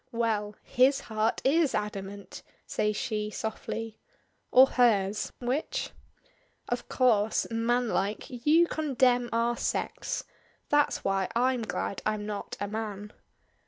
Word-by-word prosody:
"Well! 215 -3 -1
His 265 +3 +3
heart 220 0 -1
is 295 +1 +3
adamant!" 200 -1 -5 0.2
says 210 0 0
she 210 -1 -2
softly. 220 +1 -5 0.5
"Or 260 +1 +8
hers 210 -6 +2
which?" 255 +5 -2 0.8
"Of 240 0 -3
course 220 -4 +2
manlike 230 -3 0
you 300 +7 +3
condemn 255 -6 +1
our 235 +1 +1
sex. - - -2 0.5
That's 295 0 +2
why 195 -1 0
I'm 250 +1 +2
glad 215 -2 -3
I'm 215 -1 -1
not 210 -1 -5
a 205 - -2
man." 210 -1 -5
225 Hz, 115 wpm, -28 LUFS, 210-250 Hz, 0.8 s, Or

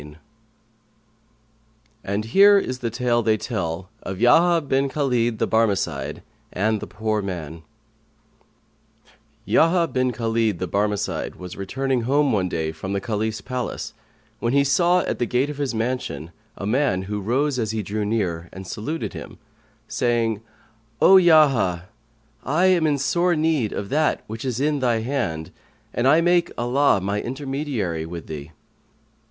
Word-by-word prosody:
"[FN#131] 75 +1 -12 1.9
And 100 +2 -2
here 200 - +6
is 130 -10 -2
the 120 - -2
tale 120 0 +1
they 110 -1 +2
tell 95 -6 -4
of 95 - -5
YAHYA 165 - +4
BIN 135 +1 +1
KHALID 125 -5 0
THE - - +1
BARMECIDE 100 -11 0 0.3
AND 110 +3 0
THE 105 - -7
POOR 110 -1 -2
MAN 85 -5 -6 1.8
Yahya 170 +1 +3
bin 130 -1 0
Khαlid 115 -3 0
the 90 - -3
Barmecide 105 +2 -1
was 90 -1 -9
returning 130 +6 -1
home, 140 +4 +2
one 95 -5 +1
day, 80 -2 -2
from 95 +5 -6
the 100 - 0
Caliph's 110 0 -2
palace, 125 -1 -4 0.5
when 120 +2 -1
he 140 0 +4
saw, 175 +6 +3
at - - -3
the 120 - 0
gate 130 +4 0
of 145 - -9
his 135 -5 -1
mansion, 110 - -3 0.3
a - - -5
man 115 -4 +1
who 105 +1 -4
rose 130 +6 0
as 110 -2 -1
he 110 -1 -2
drew 105 +2 -3
near 90 -6 -2
and 95 +1 -9
saluted 115 - -4
him, - - -9 0.5
saying, 115 -3 0 0.6
"O 190 - +8
Yahya, 135 - +4 0.5
I 155 +7 +2
am 180 -4 +4
in 145 -2 +1
sore 170 +5 +1
need 155 -8 +1
of 100 -1 -5
that 155 +2 +1
which 110 +3 -7
is 125 -2 -2
in 145 +1 +1
they 120 -4 +1
hand, 100 - -2 0.4
and 120 - +1
I 155 +4 +5
make 175 0 +2
Allah 125 -1 +2
my 100 +2 -1
intermediary 130 - -3
with 85 0 -7
thee." 75 0 -8
115 Hz, 155 wpm, -23 LUFS, 100-140 Hz, 1.9 s, O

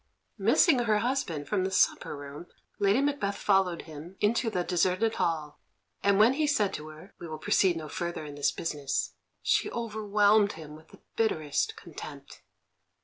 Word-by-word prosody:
Missing 305 -8 +4
her 220 -3 +2
husband 210 - -2
from 200 -3 0
the 190 - 0
supper 185 -5 +1
room, 145 +4 -9 0.3
Lady 205 +5 +3
Macbeth 280 -9 -1
followed 195 -4 +1
him 160 +4 -11
into 225 +2 +1
the 180 -5 -1
deserted 185 +5 +1
hall, 155 -4 -2 0.4
and 200 -1 +3
when 220 +5 +6
he 300 +2 0
said 210 -9 +1
to 150 - -6
her, 155 +5 -13
"We 170 - -7
will 155 -1 -6
proceed 175 +3 +2
no 155 -1 -6
further 170 0 -4
in 145 - -8
this 145 0 +1
business," 145 -4 -3 0.3
she - - +2
overwhelmed 210 -2 +2
him 155 -2 -10
with 155 +1 -16
the - - -18
bitterest 155 -10 0
contempt. - - -10
190 Hz, 165 wpm, -28 LUFS, 155-215 Hz, 0.4 s, when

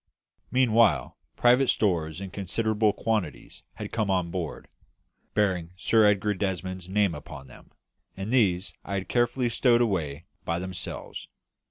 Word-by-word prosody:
Meanwhile, 120 -3 +3 0.2
private 125 +2 +4
stores 85 -8 +1
in 95 -1 -7
considerable 105 +2 0
quantities 105 -7 -3
had - - -7
come 110 -3 -1
on 90 -3 0
board, 85 -5 -5 0.7
bearing 90 -5 0
Sir 110 +2 +4
Edgar 105 0 +2
Desmond's 95 -1 -3
name 100 -2 +2
upon 70 -2 -9
them, 65 - -16 0.5
and 100 +5 -4
these 95 -7 +2
I 100 - -4
had 95 - 0
had - - -13
carefully 120 +1 +1
stowed 120 +1 +3
away 85 -8 -1 0.2
by 85 - -1
themselves. 90 0 -6
100 Hz, 140 wpm, -27 LUFS, 90-110 Hz, 0.7 s, private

